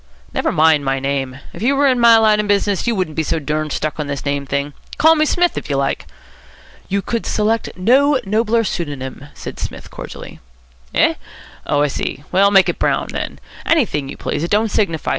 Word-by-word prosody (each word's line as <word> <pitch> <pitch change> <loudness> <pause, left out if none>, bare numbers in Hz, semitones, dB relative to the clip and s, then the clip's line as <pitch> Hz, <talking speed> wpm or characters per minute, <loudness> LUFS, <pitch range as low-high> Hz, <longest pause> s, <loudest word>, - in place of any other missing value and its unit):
"Never - - 0
mind 155 -2 +4
my 135 0 0
name. 135 -1 -2 0.2
If - - -9
you 265 +5 +2
were 285 +1 +3
in 255 -3 +3
my 235 -1 +7
line 215 -1 +4
of 210 - -1
business, 205 +1 +1
you 235 - +1
wouldn't 180 -6 -2
be 160 - +1
so 160 - -1
durned 155 0 -2
stuck 155 +2 -3
on 150 - -2
this 140 0 -4
name 140 -1 -2
thing. 140 +2 -2 0.2
Call 320 +1 +6
me 310 -1 +2
Smith, 350 +2 +1
if - - -13
you 140 - 0
like." 135 0 -1 0.8
"You 200 0 0
could 230 -1 -2
select 220 +1 0
no 265 +8 +4
nobler 225 +3 +1
pseudonym," 145 - -5
said - - -8
Psmith - - -7
cordially. - - -9 0.6
"Eh? - - +4 0.5
Oh, 145 0 +2
I - - +3
see. 140 0 -4
Well, 195 +2 +4
make 195 -2 +5
it - - -2
Brown, - - 0
then. - - -4 0.3
Anything 205 - +1
you - - -8
please. - - -3
It 170 - -2
don't 215 +2 +2
signify. 165 -7 0
185 Hz, 205 wpm, -18 LUFS, 145-225 Hz, 0.8 s, my